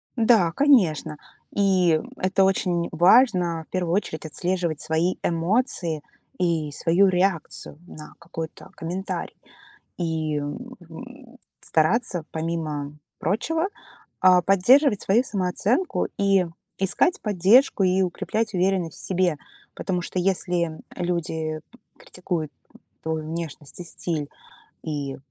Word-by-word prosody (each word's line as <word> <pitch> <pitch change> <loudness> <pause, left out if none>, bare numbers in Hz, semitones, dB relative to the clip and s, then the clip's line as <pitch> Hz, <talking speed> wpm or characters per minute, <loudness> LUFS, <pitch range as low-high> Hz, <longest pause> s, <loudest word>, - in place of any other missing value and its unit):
Да, 225 -7 +4
конечно. 170 - +3 0.4
И 185 -5 +3 0.2
это 190 +1 +2
очень 180 -3 +1
важно- 175 -2 +4
в - - -48
первую 175 -3 -1
очередь 165 -6 -3
отслеживать 175 0 -1
свои 160 +3 0
эмоции 170 - 0 0.4
и 165 -4 0
свою 170 +6 +3
реакцию 180 -5 -1
на 155 -3 -11
какой-то 165 -1 -8
комментарий. 180 +4 -4 0.6
И, 160 -3 -1
м, 145 - -5 0.9
стараться, 175 +1 +1
помимо 160 -3 -3 0.3
прочего, 320 - 0 0.5
а, 185 -1 +6
поддерживать 210 - +4
свою 225 +6 +3
самооценку 205 - 0
и 195 -2 +3 0.3
искать 195 - +1
поддержку, 210 +3 +4
и 185 +1 +3
укреплять 210 +4 -1
уверенность 180 -3 0
в - - -7
себе. 180 -4 +1 0.4
Потому 180 -2 -2
что, 180 - -3
если 175 -3 0 0.2
люди 160 -3 -2 0.4
критикуют 175 -4 -4 0.5
твою 160 -1 -2
внешность 160 -2 -6
и - - -5
стиль 160 -3 -4 0.5
и, 145 -4 -4
175 Hz, 105 wpm, -24 LUFS, 160-195 Hz, 0.9 s, а